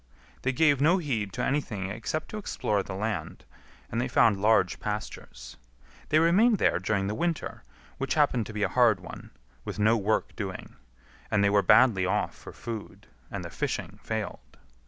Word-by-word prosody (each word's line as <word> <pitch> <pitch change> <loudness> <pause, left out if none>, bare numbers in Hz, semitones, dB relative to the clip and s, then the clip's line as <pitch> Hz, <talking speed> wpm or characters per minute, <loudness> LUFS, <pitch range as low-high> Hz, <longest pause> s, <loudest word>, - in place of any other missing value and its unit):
They 130 - +1
gave 145 0 +3
no 165 +6 +5
heed 120 - -2
to - - -2
anything 105 -9 -2
except 115 +9 -4
to 215 - -5
explore 105 - -1
the 95 - -7
land, 100 -5 -4 0.5
and 115 - 0
they 125 - -1
found 110 -5 +3
large 105 -5 +3
pastures. 105 - -6 0.5
They 155 - +4
remained 195 +8 +4
there 85 - +2
during 95 +1 0
the 100 - -2
winter, 170 +6 -2 0.4
which 135 - -1
happened 135 -7 +2
to 110 - -8
be 105 -1 -2
a - - +3
hard 120 -6 +3
one, 90 - -10 0.3
with - - -6
no 110 +2 +4
work 110 0 0
doing; - - -6 0.5
and 100 -1 +2
they 100 - +3
were 100 0 +4
badly 100 -6 +5
off 105 +3 0
for - - -11
food, 115 -3 -8 0.2
and - - -5
the - - -7
fishing - - -4
failed. - - -5
110 Hz, 175 wpm, -28 LUFS, 100-140 Hz, 0.5 s, no